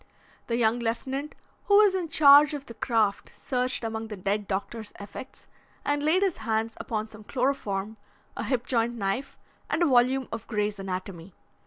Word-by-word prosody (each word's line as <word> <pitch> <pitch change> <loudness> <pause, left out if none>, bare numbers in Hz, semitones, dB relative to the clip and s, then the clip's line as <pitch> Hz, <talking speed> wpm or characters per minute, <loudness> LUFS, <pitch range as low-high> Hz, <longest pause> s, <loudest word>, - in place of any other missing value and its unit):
The 235 - 0
young 230 0 +2
lieutenant 265 +5 -3 0.3
who 405 - +4
was 415 -2 +6
in 365 -3 -1
charge 295 0 +7
of 280 -1 -7
the 230 - -9
craft 225 -4 0
searched 255 -1 -1
among 225 0 -3
the 210 -2 -7
dead 200 +2 -1
doctor's 210 +3 -4
effects 205 +6 -10 0.4
and 290 0 +1
laid 325 +6 +3
his 385 -4 0
hands 225 0 -1
upon 215 -1 -3
some 215 0 -13
chloroform, 220 -5 -2 0.4
a - - -3
hip 250 -3 -1
joint 235 -1 0
knife, 200 +5 -3 0.3
and 345 - +1
a - - +5
volume 260 -1 +3
of 225 -1 -6
Grey's 210 -2 -1
Anatomy. 185 -2 -6
230 Hz, 170 wpm, -27 LUFS, 210-275 Hz, 0.4 s, charge